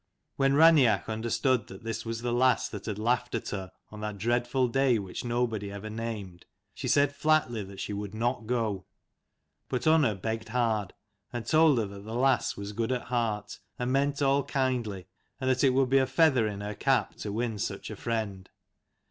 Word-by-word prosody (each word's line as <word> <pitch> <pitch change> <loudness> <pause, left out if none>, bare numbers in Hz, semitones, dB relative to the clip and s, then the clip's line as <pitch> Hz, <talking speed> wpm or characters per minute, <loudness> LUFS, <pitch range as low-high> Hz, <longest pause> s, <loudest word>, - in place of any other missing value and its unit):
When 135 0 +2
Raineach 140 - +5
understood 115 +2 0
that 95 +2 -11
this 115 0 -4
was 115 0 -4
the 120 -1 0
lass 125 0 +3
that 105 0 -8
had 105 -2 -3
laughed 120 +3 0
at 115 - -3
her, 95 -2 -5 0.2
on 105 0 -9
that 105 -1 -4
dreadful 120 +4 +1
day 130 0 +2
which 95 -3 -5
nobody 120 -4 -1
ever 100 +2 -7
named, 105 -6 -6 0.3
she - - -5
said 145 0 +3
flatly 145 -8 +1
that 95 0 -11
she 105 - -4
would 100 0 -5
not 120 0 -1
go. 110 -6 -1 0.8
But 125 +2 -2
Unna 155 -9 +4
begged 110 +3 -4
hard, 110 -5 0 0.4
and 120 -2 -5
told 155 -3 +5
her 110 - +1
that 100 0 -9
the 110 +2 -6
lass 130 +1 +2
was 100 0 -5
good 115 +3 -1
at 125 -2 -3
heart, 115 -4 -2 0.2
and 125 +1 -2
meant 140 +1 +1
all 140 +1 +3
kindly, 120 -9 -1 0.3
and 130 - -2
that 130 +1 +2
it 135 - +6
would 130 0 +2
be 135 - +6
a 130 - +2
feather 130 -4 +3
in 100 -1 -5
her 105 +1 -4
cap 135 +6 +1
to 105 - -5
win 110 0 -2
such - - -4
a - - -5
friend. 105 -5 -3
115 Hz, 195 wpm, -28 LUFS, 105-130 Hz, 0.8 s, it